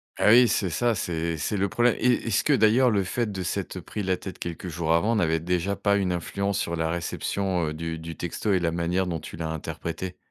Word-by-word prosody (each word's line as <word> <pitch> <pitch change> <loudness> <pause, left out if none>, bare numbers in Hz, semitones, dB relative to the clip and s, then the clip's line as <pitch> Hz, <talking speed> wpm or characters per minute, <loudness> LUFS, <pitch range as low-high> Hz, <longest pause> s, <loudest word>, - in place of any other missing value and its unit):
Ah, - - +3
oui, 120 +1 +8
c'est 95 -5 +1
ça, 120 +4 +1
c'est 85 -2 -2
c'est 100 +8 -2
le 100 0 +1
problème 120 +2 +3
et 125 -1 +2
est-ce 105 - +2
que, - - +3
d'ailleurs, 115 +4 +5
le 100 -3 +2
fait 110 +3 -2
de 95 -2 -4
s'être 95 0 -3
pris 105 +5 -6
la 95 -1 +1
tête 95 -1 -8
quelques 85 +1 -5
jours 80 -1 0
avant 105 +8 +2
n'avait 80 -5 +2
déjà 90 +3 -1
pas 100 0 +2
une 95 -2 0
influence 100 +3 -2
sur 85 - -2
la 80 0 -1
réception, 90 +1 -1
heu, 75 - -3
du 80 0 -4
du 80 0 -7
texto 90 +4 -2
et 95 - +3
la 85 -1 0
manière 85 +2 0
dont 85 -2 -2
tu - - -9
l'as 80 -1 -3
interprété? 85 +3 -5
90 Hz, 240 wpm, -26 LUFS, 85-100 Hz, -, oui